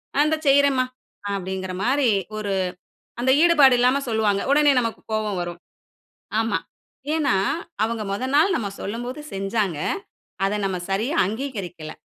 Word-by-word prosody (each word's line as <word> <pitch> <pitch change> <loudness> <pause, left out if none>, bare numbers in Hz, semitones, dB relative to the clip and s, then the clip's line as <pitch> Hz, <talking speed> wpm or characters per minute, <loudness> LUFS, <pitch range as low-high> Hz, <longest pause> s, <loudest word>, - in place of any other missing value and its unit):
"அ - - +2
இந்த 315 +1 +1
செய்றேன்ம்மா." 275 -2 +4 0.5
அப்பிடிங்கிற 190 -1 -4
மாதிரி, 265 +1 +2 0.3
ஒரு 205 -2 -3 0.7
அந்த 260 +1 +3
ஈடுபாடு 295 -7 +6
இல்லாம 255 +3 +4
சொல்லுவாங்க, 215 -3 +1
உடனே 295 0 +5
நமக்கு 230 -1 -3
கோவம் 215 -3 -1
வரும், 175 0 -5 0.8
ஆமா. 225 - 0 0.6
ஏன்னா, 290 -8 +2 0.5
அவங்க 225 0 -1
முதல் 255 +6 -2
நாள் 330 +6 +4
நம்ம 210 -5 -2
சொல்லும்போது 245 +7 -5
செஞ்சாங்க, 195 -4 -1 0.7
அதை 200 +2 +1
நம்ம 190 -2 -1
சரியா 220 +10 0
அங்கீகரிக்கல, 195 - -5
225 Hz, 130 wpm, -23 LUFS, 195-270 Hz, 0.8 s, ஈடுபாடு